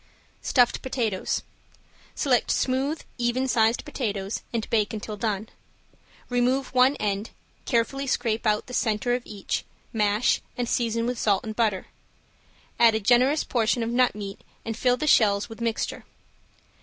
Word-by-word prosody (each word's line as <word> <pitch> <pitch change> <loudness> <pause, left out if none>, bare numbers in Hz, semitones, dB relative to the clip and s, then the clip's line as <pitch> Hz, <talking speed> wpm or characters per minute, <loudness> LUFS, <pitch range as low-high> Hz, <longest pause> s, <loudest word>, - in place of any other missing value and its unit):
~STUFFED 245 -3 +2
POTATOES~ 230 -7 -1 0.7
Select 250 -5 +2
smooth, 270 +4 0 0.2
even 245 +2 +1
sized 230 0 +2
potatoes 210 -8 -3
and 230 -2 -2
bake 215 -2 +1
until 215 0 -5
done. 210 0 -2 0.8
Remove 250 +2 0
one 255 +2 +5
end, 205 -2 -2 0.4
carefully 270 +3 0
scrape 230 -3 0
out 210 0 +1
the 250 - -10
center 230 0 +1
of 245 - 0
each 205 -2 -3 0.3
mash 210 +1 +2 0.2
and 245 -1 -1
season 230 -1 0
with 245 0 -2
salt 200 -3 +2
and 220 -1 -5
butter, 215 -5 +1 0.9
add 230 -2 +6
a - - +1
generous 250 +7 +3
portion 235 0 +1
of 230 - -2
nut 250 -1 +3
meat 200 -2 -7 0.2
and 225 - -3
fill 250 +1 +2
the 305 - -2
shells 210 -7 +4
with 225 - -10
the - - -4
mixture. 225 -1 -2
230 Hz, 150 wpm, -25 LUFS, 215-250 Hz, 0.9 s, add